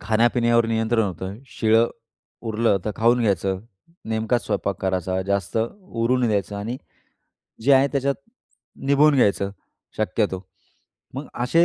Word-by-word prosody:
खाण्यापिण्यावर 115 Hz, +1 st, +3 dB
नियंत्रण 115 Hz, 0 st, +1 dB
होतं. 95 Hz, +1 st, -5 dB
शिळं 115 Hz, -1 st, +3 dB, 0.6 s
उरलं 110 Hz, -1 st, +2 dB
तर 105 Hz, -, -1 dB
खाऊन 120 Hz, +2 st, +3 dB
घ्यायचं. 95 Hz, -3 st, +1 dB, 0.5 s
नेमकाच 110 Hz, +2 st, 0 dB
स्वयंपाक 100 Hz, -3 st, -2 dB
करायचा. 95 Hz, 0 st, -1 dB
जास्त 100 Hz, 0 st, -1 dB, 0.3 s
उरू 120 Hz, -8 st, 0 dB
नाही 125 Hz, -2 st, +1 dB
द्यायचं 100 Hz, -1 st, -1 dB
आणि 110 Hz, +5 st, -4 dB, 0.9 s
जे 140 Hz, +4 st, +4 dB
आहे 135 Hz, +1 st, +6 dB
त्याच्यात 140 Hz, 0 st, +1 dB, 0.7 s
निभून 145 Hz, +2 st, +5 dB
घ्यायचं 100 Hz, -6 st, +2 dB, 0.5 s
शक्यतो. 100 Hz, -2 st, 0 dB, 0.7 s
मग 140 Hz, +3 st, -5 dB, 0.2 s
असे 165 Hz, +8 st, +4 dB
115 Hz, 125 wpm, -23 LUFS, 100-120 Hz, 0.9 s, आहे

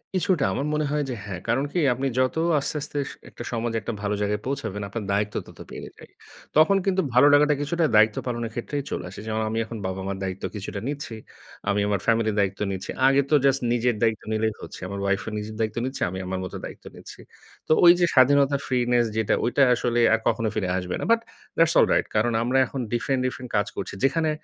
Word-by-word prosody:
কিছুটা 180 Hz, -5 st, +2 dB
আমার 140 Hz, -, -2 dB
মনে 150 Hz, 0 st, 0 dB
হয় 150 Hz, 0 st, 0 dB
যে 125 Hz, -, -3 dB
হ্যাঁ। 90 Hz, -3 st, -5 dB
কারণ 130 Hz, +4 st, +1 dB
কি 180 Hz, -, 0 dB
আপনি 135 Hz, +3 st, -2 dB
যত 130 Hz, 0 st, +1 dB, 0.2 s
আস্তে, 140 Hz, -, -3 dB
আস্তে 150 Hz, 0 st, -6 dB
স -, -, -8 dB, 0.2 s
একটা -, -, -9 dB
সমাজে 115 Hz, -1 st, -1 dB
একটা 115 Hz, -, -4 dB
ভালো 105 Hz, 0 st, -1 dB
জায়গায় 105 Hz, 0 st, -1 dB
পৌঁছাবেন, 110 Hz, -7 st, -3 dB
আপনার 110 Hz, +1 st, -5 dB
দায়িত্ব 105 Hz, +1 st, 0 dB
তত -, -, -15 dB
বেড়ে -, -, -7 dB
যায়। -, -, -15 dB, 0.5 s
তখন 175 Hz, +6 st, +6 dB
কিন্তু 190 Hz, -1 st, +2 dB
ভালো 125 Hz, +4 st, +6 dB
লাগাটা 150 Hz, +1 st, +5 dB
কিছুটা 165 Hz, +3 st, 0 dB
দায়িত্ব 110 Hz, 0 st, +5 dB
পালনের 120 Hz, -2 st, -3 dB
ক্ষেত্রেই 140 Hz, +4 st, -3 dB
চলে -, -, -3 dB
আসে। 95 Hz, -, -10 dB
যেমন 110 Hz, 0 st, -1 dB
আমি 110 Hz, -, -2 dB
এখন 115 Hz, 0 st, -7 dB
বাবা-মার 95 Hz, +1 st, -3 dB
দায়িত্ব 95 Hz, 0 st, -5 dB
কিছুটা 100 Hz, 0 st, -5 dB
নিচ্ছি। 145 Hz, -5 st, -5 dB, 0.5 s
আমি 100 Hz, 0 st, +2 dB
আমার 100 Hz, -1 st, 0 dB
ফ্যামিলির 115 Hz, -2 st, +2 dB
দায়িত্ব 100 Hz, -1 st, 0 dB
নিচ্ছি। 95 Hz, 0 st, -5 dB, 0.2 s
আগে 135 Hz, +1 st, +4 dB
তো 155 Hz, -, +4 dB
জাস্ট 135 Hz, 0 st, +3 dB
নিজের 120 Hz, -1 st, +1 dB
দায়িত্ব 110 Hz, -2 st, +1 dB
নিলেই 110 Hz, 0 st, 0 dB
হচ্ছে। -, -, -9 dB
আমার 100 Hz, +1 st, -5 dB
ওয়াইফও 100 Hz, +2 st, 0 dB
নিজের 105 Hz, +1 st, -6 dB
দায়িত্ব 110 Hz, 0 st, -1 dB
নিচ্ছে। 130 Hz, +1 st, -5 dB
আমি 95 Hz, -, -5 dB
আমার 95 Hz, 0 st, -3 dB
মত -, -, -8 dB
দায়িত্ব -, -, -10 dB
নিচ্ছি। -, -, -12 dB, 0.5 s
তো -, -, -2 dB
ওই 170 Hz, -, +11 dB
যে 175 Hz, -, +5 dB
স্বাধীনতার 140 Hz, +1 st, +4 dB
ফ্রিনেস 120 Hz, -1 st, +2 dB
যেটা 110 Hz, -2 st, +1 dB
ঐটা 130 Hz, +3 st, +3 dB
আসলে 120 Hz, 0 st, 0 dB
আর 115 Hz, -, +3 dB
কখনো 115 Hz, -, +1 dB
ফিরে 100 Hz, -4 st, -1 dB
আসবে 90 Hz, -1 st, -3 dB
না। -, -, -4 dB
বাট 230 Hz, -, +5 dB, 0.4 s
দ্যাটস 165 Hz, 0 st, +4 dB
অলরাইট -, -, +3 dB
কারণ 115 Hz, +2 st, +2 dB
আমরা 125 Hz, +3 st, +1 dB
এখন 135 Hz, -, -6 dB
ডিফারেন্ট, 130 Hz, +2 st, 0 dB
ডিফারেন্ট 125 Hz, -1 st, -4 dB
কাজ 105 Hz, 0 st, +1 dB
করছি। -, -, -5 dB
যেখানে 160 Hz, +4 st, +2 dB
120 Hz, 215 wpm, -24 LUFS, 105-140 Hz, 0.5 s, ওই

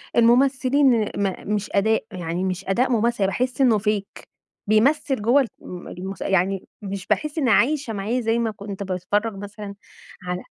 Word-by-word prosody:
الممثلين 260 Hz, +1 st, +4 dB, 0.2 s
م 200 Hz, +1 st, -2 dB
مش 205 Hz, 0 st, -3 dB
أداء، 220 Hz, +2 st, +2 dB
يعني 175 Hz, -1 st, -3 dB
مش 185 Hz, 0 st, -3 dB
أداء 245 Hz, +7 st, +2 dB
ممثل، 235 Hz, 0 st, +1 dB
يعني -, -, +3 dB
باحس 255 Hz, +5 st, -1 dB
إنه 235 Hz, -5 st, +4 dB
fake 210 Hz, -1 st, -2 dB, 0.4 s
بيمثّل 260 Hz, +4 st, +2 dB
جوّه 245 Hz, +5 st, +3 dB
الم 180 Hz, -1 st, -9 dB
المس 190 Hz, +2 st, -7 dB
يعني 190 Hz, 0 st, 0 dB
مش 195 Hz, -2 st, -6 dB
باحس 305 Hz, +1 st, -1 dB
إني 270 Hz, -6 st, +2 dB
عايشة 265 Hz, +2 st, +2 dB
معاه 215 Hz, +5 st, -1 dB
زي 225 Hz, 0 st, +1 dB
ما 230 Hz, -1 st, 0 dB
كنت 200 Hz, -1 st, -7 dB
باتفرج 195 Hz, +3 st, -1 dB
مثلًا 205 Hz, 0 st, -8 dB, 0.5 s
على 180 Hz, 0 st, -4 dB
210 Hz, 160 wpm, -23 LUFS, 195-245 Hz, 0.5 s, الممثلين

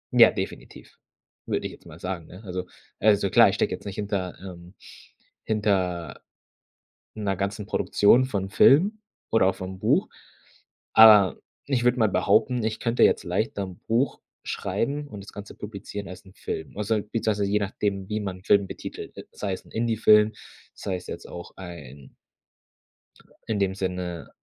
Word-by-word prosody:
Ja, -, -, +9 dB
definitiv, -, -, -7 dB, 0.5 s
würde -, -, -1 dB
ich -, -, -3 dB
jetzt -, -, -16 dB
mal -, -, -12 dB
sagen, 90 Hz, -3 st, -5 dB
ne? 95 Hz, +5 st, -13 dB
Also 90 Hz, -1 st, -5 dB, 0.3 s
also 100 Hz, -2 st, +3 dB
klar, -, -, +7 dB
ich -, -, -2 dB
stecke -, -, 0 dB
jetzt -, -, -8 dB
nicht 100 Hz, -2 st, -6 dB
hinter 100 Hz, -3 st, -3 dB
ähm, 90 Hz, -1 st, -11 dB, 0.7 s
hinter 95 Hz, -, -1 dB, 0.9 s
'ner 100 Hz, -3 st, -2 dB
ganzen 100 Hz, +1 st, -3 dB
Produktion 110 Hz, +4 st, +3 dB
von 100 Hz, -7 st, -3 dB
Filmen 190 Hz, -, +5 dB, 0.3 s
oder 110 Hz, -4 st, +4 dB
auch 95 Hz, -, +1 dB
vom 95 Hz, 0 st, -7 dB
Buch, -, -, +2 dB, 0.8 s
aber 105 Hz, -4 st, +8 dB, 0.3 s
ich 130 Hz, -4 st, 0 dB
würde 125 Hz, +1 st, +3 dB
mal 110 Hz, -2 st, +4 dB
behaupten, 110 Hz, +5 st, +2 dB
ich 110 Hz, 0 st, -2 dB
könnte 115 Hz, 0 st, +2 dB
jetzt -, -, +4 dB
leichter 100 Hz, +3 st, -2 dB
'n 95 Hz, -2 st, -9 dB
Buch 120 Hz, +5 st, +1 dB, 0.2 s
schreiben 140 Hz, +10 st, -2 dB
und 105 Hz, -6 st, -9 dB
das 100 Hz, -, -12 dB
Ganze 100 Hz, 0 st, -9 dB
publizieren 100 Hz, -1 st, -7 dB
als 95 Hz, -, -11 dB
'n 95 Hz, -, -16 dB
Film. 80 Hz, -, -6 dB
Also, 105 Hz, +1 st, 0 dB
beziehungsweise 105 Hz, -1 st, -1 dB
je 105 Hz, +1 st, +2 dB
nachdem, 100 Hz, -1 st, -2 dB
wie 105 Hz, -, -1 dB
man 95 Hz, -2 st, -6 dB
Film 100 Hz, -1 st, +3 dB
betitelt, -, -, -8 dB, 0.2 s
sei 100 Hz, -2 st, -3 dB
es -, -, -7 dB
'n -, -, -19 dB
Indie-Film, 110 Hz, -2 st, +4 dB, 0.4 s
sei 95 Hz, -3 st, -4 dB
es 90 Hz, -, -12 dB
jetzt -, -, -7 dB
auch 85 Hz, 0 st, -9 dB
ein 75 Hz, -7 st, -11 dB, 1.3 s
in 105 Hz, -2 st, -1 dB
dem 95 Hz, -1 st, 0 dB
Sinne, 90 Hz, -3 st, -4 dB
100 Hz, 160 wpm, -25 LUFS, 95-110 Hz, 1.3 s, Ja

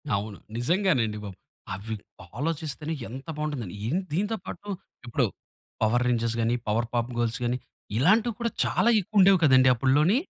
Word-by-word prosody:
అవును. 100 Hz, 0 st, -4 dB, 0.2 s
నిజంగానండి 130 Hz, -, +1 dB
బాబు. 100 Hz, -3 st, -8 dB, 0.4 s
అవి 105 Hz, +4 st, -5 dB, 0.4 s
ఆలోచిస్తేనే 155 Hz, 0 st, -2 dB, 0.2 s
ఎంత 130 Hz, +3 st, -8 dB
బాగుంటుందని. 145 Hz, -11 st, -3 dB
ఎన్ 160 Hz, +10 st, +1 dB
దీనితో 210 Hz, +6 st, 0 dB
పాటు 205 Hz, -, -8 dB, 0.4 s
ఇప్పుడు 120 Hz, -, +1 dB, 0.6 s
పవర్ 120 Hz, +3 st, +3 dB
రేంజెస్‌గాని, 115 Hz, -1 st, +1 dB
పవర్ 115 Hz, +2 st, +1 dB
పాప్ 120 Hz, +1 st, 0 dB
గర్ల్స్‌గాని 120 Hz, +1 st, 0 dB, 0.4 s
ఇలాంటివి 215 Hz, -, +4 dB
కూడా 235 Hz, -1 st, -1 dB
చాలా 235 Hz, -, +2 dB
ఎక్కువుండేవి 195 Hz, 0 st, +5 dB
కదండీ 130 Hz, -3 st, +6 dB
అప్పడ్లోని. 140 Hz, -, +3 dB
130 Hz, 130 wpm, -27 LUFS, 115-165 Hz, 0.6 s, కదండీ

